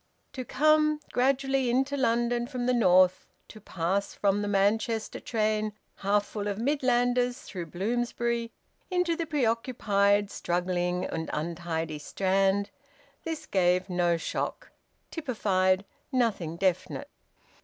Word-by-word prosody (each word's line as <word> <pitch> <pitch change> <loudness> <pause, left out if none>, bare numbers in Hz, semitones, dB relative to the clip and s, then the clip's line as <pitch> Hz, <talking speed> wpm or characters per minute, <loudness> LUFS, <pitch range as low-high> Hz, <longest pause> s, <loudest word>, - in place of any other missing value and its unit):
To 255 - -4
come 305 +3 +3
gradually 270 0 +2
into 265 +3 +1
London 240 -2 +1
from 250 -1 -3
the 250 - +2
North, 185 -5 +4 0.2
to 215 - -12
pass 190 +2 -2
from 200 0 +1
the 205 - -2
Manchester 210 +3 0
train 215 -1 0 0.2
half 205 +1 +1
full 205 -1 -5
of 200 -1 -2
Midlanders 245 -1 +1
through 175 -4 -6
Bloomsbury 235 +5 -1 0.4
into 360 -2 +1
the 330 -1 -3
preoccupied, 225 -7 +1
struggling, 180 0 -1
and 160 0 -4
untidy 160 -1 -3
Strand 195 +4 +1 0.5
this 325 -2 -4
gave 185 0 +1
no 175 -1 +2
shock, 165 - -4 0.4
typified 195 - +1 0.3
nothing 220 - 0
definite. 185 -1 -1
210 Hz, 115 wpm, -28 LUFS, 185-245 Hz, 0.5 s, North